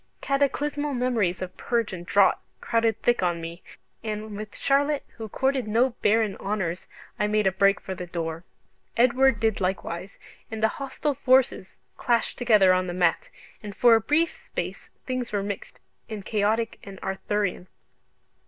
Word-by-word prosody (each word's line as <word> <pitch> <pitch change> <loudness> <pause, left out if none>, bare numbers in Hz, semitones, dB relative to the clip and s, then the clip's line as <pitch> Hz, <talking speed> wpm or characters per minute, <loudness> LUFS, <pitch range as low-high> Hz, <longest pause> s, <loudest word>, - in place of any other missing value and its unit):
Cataclysmal 285 +1 0
memories 225 -8 0
of 185 - -7
purge 235 -4 -1
and 175 -1 -7
draught 200 0 +4 0.2
crowded 225 -1 +1
thick 240 -3 +3
on 175 -2 0
me, 165 +1 -7 0.4
and 215 -1 -4
with 215 0 -7
Charlotte 285 +1 +1
who 220 -2 -6
courted 265 0 0
no 235 +5 +3
barren 215 -1 +2
honours 190 -4 -3 0.3
I 210 - +2
made 210 0 +1
a 190 - +4
break 195 +1 +3
for 190 - -6
the 180 -1 -7
door. 165 -1 -4 0.5
Edward 255 +3 +4
did 220 -3 +1
likewise, 185 0 -3 0.3
and 220 0 -5
the 220 - +5
hostile 280 +2 -2
forces 260 -6 +2 0.2
clashed 235 -2 0
together 210 -6 +5
on 185 0 +1
the 175 - -4
mat, 175 -2 +1 0.3
and 205 -2 -8
for 240 -1 +6
a 225 - +5
brief 300 +9 +2
space - - -6 0.2
things 255 -2 -3
were 205 -2 -1
mixed 200 -1 -6 0.3
and 210 -3 -6
chaotic 220 +2 0
and 195 -1 -10
Arthurian. 190 -1 -2
215 Hz, 160 wpm, -26 LUFS, 190-245 Hz, 0.5 s, for